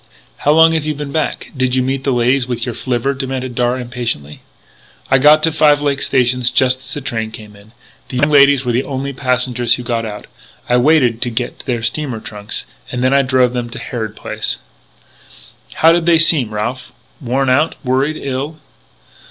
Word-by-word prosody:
"How 145 Hz, -, +1 dB
long 160 Hz, +1 st, +6 dB
have 160 Hz, -2 st, 0 dB
you 155 Hz, 0 st, -2 dB
been 145 Hz, -1 st, -6 dB
back! 155 Hz, +1 st, -3 dB
Did 130 Hz, -1 st, 0 dB
you 130 Hz, -, +2 dB
meet 135 Hz, +1 st, -2 dB
the 140 Hz, -, +1 dB
ladies 125 Hz, +1 st, +1 dB
with 120 Hz, -2 st, -2 dB
your 120 Hz, -, -4 dB
flivver?" 130 Hz, +2 st, -1 dB
demanded 130 Hz, -2 st, -4 dB
Darragh, 125 Hz, +1 st, 0 dB
impatiently. 120 Hz, -, -5 dB, 0.7 s
"I 135 Hz, -, +5 dB
got 150 Hz, +3 st, +5 dB
to 165 Hz, -, +3 dB
Five 150 Hz, -2 st, +4 dB
Lakes 145 Hz, -1 st, -1 dB
station 125 Hz, -1 st, +1 dB
just 130 Hz, +1 st, +2 dB
as 130 Hz, 0 st, -10 dB
the 145 Hz, -, -4 dB
train 110 Hz, -4 st, -3 dB
came 110 Hz, -2 st, -12 dB
in. 100 Hz, +2 st, -18 dB, 0.4 s
The 125 Hz, -, -4 dB
young 145 Hz, +4 st, +2 dB
ladies 140 Hz, -2 st, +5 dB
were 125 Hz, -, 0 dB
the 120 Hz, +2 st, +1 dB
only 140 Hz, 0 st, -4 dB
passengers 125 Hz, -2 st, +1 dB
who 125 Hz, -, -7 dB
got 120 Hz, -1 st, -2 dB
out. 105 Hz, -2 st, -7 dB, 0.4 s
I 125 Hz, -, +3 dB
waited 125 Hz, -4 st, +3 dB
to 120 Hz, -, 0 dB
get 120 Hz, +1 st, -4 dB
their 125 Hz, -, 0 dB
two -, -, -11 dB
steamer 120 Hz, 0 st, -2 dB
trunks 105 Hz, -1 st, -6 dB, 0.3 s
and 125 Hz, 0 st, -2 dB
then 130 Hz, +1 st, +3 dB
I 140 Hz, -, +5 dB
drove 130 Hz, -2 st, +2 dB
them 120 Hz, -1 st, -3 dB
to -, -, -9 dB
Harrod 110 Hz, -3 st, -5 dB
Place -, -, -3 dB, 0.6 s
" -, -, -22 dB
"How 165 Hz, -, +5 dB
did 170 Hz, 0 st, +1 dB
they 170 Hz, -1 st, +5 dB
seem, 155 Hz, -8 st, +3 dB
Ralph 120 Hz, +4 st, -4 dB, 0.3 s
worn 130 Hz, +1 st, 0 dB
out 145 Hz, +5 st, +2 dB
worried 135 Hz, +5 st, 0 dB
ill?" 140 Hz, +3 st, -4 dB
130 Hz, 200 wpm, -16 LUFS, 120-140 Hz, 0.7 s, long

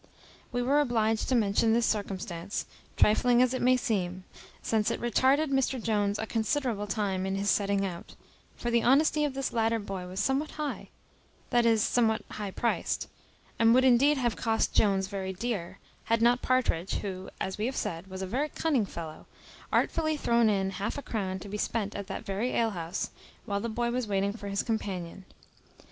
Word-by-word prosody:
We 245 Hz, 0 st, -1 dB
were 280 Hz, +4 st, +3 dB
obliged 225 Hz, -5 st, +1 dB
to 260 Hz, -, +3 dB
mention 220 Hz, 0 st, +3 dB
this 235 Hz, 0 st, +3 dB
circumstance, 195 Hz, -3 st, -3 dB, 0.3 s
trifling 240 Hz, +3 st, +4 dB
as 255 Hz, 0 st, +4 dB
it 255 Hz, -, -2 dB
may 255 Hz, +1 st, +4 dB
seem, 190 Hz, -8 st, -2 dB, 0.4 s
since 220 Hz, -2 st, +1 dB
it -, -, -2 dB
retarded 265 Hz, +6 st, +2 dB
Mr 270 Hz, -1 st, +1 dB
Jones 210 Hz, -2 st, 0 dB
a 220 Hz, -, -3 dB
considerable 225 Hz, -1 st, -1 dB
time 195 Hz, -2 st, -1 dB
in 190 Hz, -, -1 dB
his 200 Hz, +1 st, +1 dB
setting 200 Hz, -1 st, +1 dB
out; 175 Hz, -3 st, -7 dB, 0.4 s
for 240 Hz, -, -3 dB
the 235 Hz, 0 st, +3 dB
honesty 300 Hz, +5 st, +4 dB
of 280 Hz, -2 st, -3 dB
this 270 Hz, -1 st, -2 dB
latter 230 Hz, 0 st, +2 dB
boy 195 Hz, -4 st, -5 dB
was 185 Hz, +1 st, -5 dB
somewhat 270 Hz, +8 st, +1 dB
high 300 Hz, -2 st, -4 dB, 0.6 s
that 240 Hz, -1 st, +4 dB
is, 225 Hz, -2 st, +4 dB
somewhat 225 Hz, -2 st, +2 dB
high 205 Hz, -2 st, -4 dB
priced, 235 Hz, +5 st, -1 dB, 0.5 s
and 230 Hz, +1 st, +6 dB
would 260 Hz, +1 st, +5 dB
indeed 270 Hz, +4 st, +5 dB
have 240 Hz, -3 st, 0 dB
cost 225 Hz, -2 st, 0 dB
Jones 195 Hz, -2 st, +3 dB
very 190 Hz, -1 st, -4 dB
dear, 200 Hz, -4 st, -3 dB, 0.3 s
had 230 Hz, 0 st, +2 dB
not 240 Hz, +2 st, +4 dB
Partridge, 240 Hz, -9 st, +1 dB
who, 190 Hz, -2 st, -5 dB
as 190 Hz, +1 st, -3 dB
we 215 Hz, -, 0 dB
have 265 Hz, -, -3 dB
said, 170 Hz, +3 st, -3 dB
was 190 Hz, 0 st, -6 dB
a -, -, -1 dB
very 270 Hz, +10 st, -1 dB
cunning 280 Hz, -12 st, 0 dB
fellow, 160 Hz, -3 st, -8 dB, 0.4 s
artfully 315 Hz, -2 st, +1 dB
thrown 235 Hz, -4 st, +3 dB
in 195 Hz, -2 st, +1 dB
half 195 Hz, +6 st, -3 dB
a 285 Hz, -, -5 dB
crown 190 Hz, -4 st, -3 dB
to 195 Hz, -, -9 dB
be 210 Hz, +1 st, -5 dB
spent 210 Hz, -2 st, -1 dB
at 200 Hz, -1 st, -5 dB
that 195 Hz, -, -6 dB
very 205 Hz, +6 st, -2 dB
alehouse, 180 Hz, -7 st, -1 dB, 0.3 s
while 200 Hz, -1 st, -1 dB
the 235 Hz, -, -3 dB
boy 235 Hz, +2 st, -1 dB
was 250 Hz, -1 st, -1 dB
waiting 200 Hz, 0 st, 0 dB
for 210 Hz, -2 st, -8 dB
his 200 Hz, 0 st, -1 dB
companion. 195 Hz, -5 st, -4 dB
220 Hz, 190 wpm, -29 LUFS, 195-245 Hz, 0.6 s, and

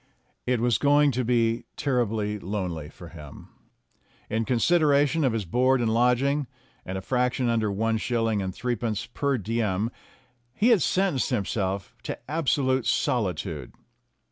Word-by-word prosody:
It 125 Hz, -1 st, +2 dB
was 120 Hz, -1 st, +2 dB
going 145 Hz, 0 st, +4 dB
to 130 Hz, 0 st, -1 dB
be 115 Hz, -1 st, +1 dB
terribly 110 Hz, -6 st, -1 dB
lonely 90 Hz, -6 st, -4 dB
for 85 Hz, +1 st, -12 dB
him. 75 Hz, -4 st, -12 dB, 0.8 s
In 110 Hz, +1 st, 0 dB
con 125 Hz, 0 st, +1 dB
sideration 150 Hz, +1 st, +3 dB
of 130 Hz, -, +3 dB
his 110 Hz, -3 st, -2 dB
board 130 Hz, +8 st, +2 dB
and 115 Hz, -2 st, +1 dB
lodging, 125 Hz, +4 st, +2 dB, 0.4 s
and 95 Hz, +1 st, -5 dB
a -, -, -4 dB
fraction 125 Hz, +2 st, 0 dB
under 110 Hz, -3 st, +1 dB
one 110 Hz, +2 st, 0 dB
shilling 115 Hz, -3 st, 0 dB
and 95 Hz, -1 st, -3 dB
threepence 115 Hz, -1 st, -2 dB
per 140 Hz, +2 st, -1 dB
diem, 110 Hz, -1 st, -1 dB, 0.6 s
he 225 Hz, -, +3 dB
had 225 Hz, -7 st, +5 dB
sentenced 185 Hz, -9 st, +1 dB
himself 100 Hz, -4 st, -2 dB
to -, -, -5 dB
absolute 135 Hz, -4 st, +1 dB
solitude. 100 Hz, -10 st, -1 dB
120 Hz, 145 wpm, -26 LUFS, 105-130 Hz, 0.8 s, had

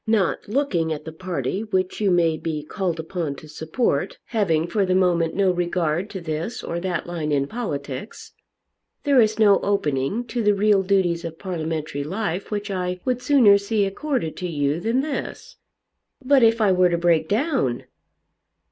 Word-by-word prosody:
Not 215 Hz, -5 st, +1 dB
looking 200 Hz, -, 0 dB
at 150 Hz, -1 st, -4 dB
the 160 Hz, -, -6 dB
party 175 Hz, -, -3 dB
which 190 Hz, -2 st, -2 dB
you 205 Hz, -, +3 dB
may 170 Hz, -3 st, +3 dB
be 155 Hz, -1 st, -4 dB
called 175 Hz, 0 st, -3 dB
upon 160 Hz, -3 st, -3 dB
to 155 Hz, -, -12 dB
support, 160 Hz, -, -1 dB
having 165 Hz, -8 st, +1 dB
for 195 Hz, +4 st, 0 dB
the 185 Hz, -1 st, +1 dB
moment 175 Hz, -3 st, +2 dB
no 195 Hz, -2 st, +3 dB
regard 175 Hz, +1 st, -1 dB
to 190 Hz, -, -6 dB
this 165 Hz, +6 st, -4 dB
or 170 Hz, -, -3 dB
that 180 Hz, -1 st, -2 dB
line 165 Hz, -3 st, -3 dB
in 140 Hz, -1 st, +2 dB
politics, 145 Hz, -, -6 dB, 0.7 s
there 280 Hz, -3 st, +5 dB
is 215 Hz, -1 st, +2 dB
no 205 Hz, -3 st, +5 dB
opening 155 Hz, -, 0 dB
to 240 Hz, 0 st, -3 dB
the 210 Hz, -1 st, +3 dB
real 205 Hz, 0 st, +3 dB
duties 185 Hz, -3 st, +1 dB
of 165 Hz, -1 st, -6 dB
parliamentary 160 Hz, -5 st, -3 dB
life 190 Hz, +2 st, -3 dB
which 205 Hz, -1 st, -3 dB
I 180 Hz, -1 st, -2 dB
would 250 Hz, -1 st, 0 dB
sooner 235 Hz, -9 st, +5 dB
see 200 Hz, 0 st, 0 dB
accorded 220 Hz, -, -2 dB
to 180 Hz, -, -3 dB
you 145 Hz, -1 st, 0 dB
than 230 Hz, +7 st, +1 dB
this." 310 Hz, -, -5 dB, 0.7 s
"But 275 Hz, 0 st, +5 dB
if 225 Hz, 0 st, +4 dB
I 205 Hz, -3 st, +4 dB
were 180 Hz, -1 st, +4 dB
to 170 Hz, -, +1 dB
break 170 Hz, -2 st, +2 dB
down?" 240 Hz, -, 0 dB
185 Hz, 175 wpm, -23 LUFS, 160-215 Hz, 0.7 s, there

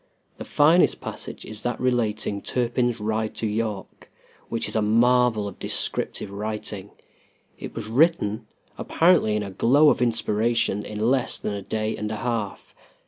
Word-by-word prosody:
The -, -, -6 dB
finest 160 Hz, +5 st, +4 dB
passage -, -, -8 dB
is 110 Hz, -1 st, -6 dB
that 120 Hz, 0 st, -2 dB
relating 110 Hz, -5 st, 0 dB
Turpin's 120 Hz, -1 st, 0 dB
ride 110 Hz, +1 st, -2 dB
to -, -, -3 dB
York, 105 Hz, -2 st, -4 dB, 0.4 s
which 115 Hz, -, -1 dB
is -, -, -5 dB
a 110 Hz, -, +2 dB
marvel 115 Hz, 0 st, +3 dB
of 100 Hz, -, -9 dB
descriptive 100 Hz, -, -2 dB
writing. 105 Hz, -1 st, -5 dB, 0.7 s
It -, -, -8 dB
was 115 Hz, -, -5 dB
written, 115 Hz, -4 st, +1 dB, 0.3 s
apparently 165 Hz, -11 st, +3 dB
in 105 Hz, -, -1 dB
a 100 Hz, -, -6 dB
glow 140 Hz, +10 st, +4 dB
of -, -, +1 dB
inspiration, 115 Hz, -2 st, +1 dB
in 110 Hz, +3 st, -1 dB
less 135 Hz, -2 st, 0 dB
than 105 Hz, -, -4 dB
a 100 Hz, -, -4 dB
day 110 Hz, +2 st, -2 dB
and 105 Hz, -, -4 dB
a 110 Hz, -, -3 dB
half. 110 Hz, -3 st, -4 dB
110 Hz, 155 wpm, -24 LUFS, 105-120 Hz, 0.7 s, finest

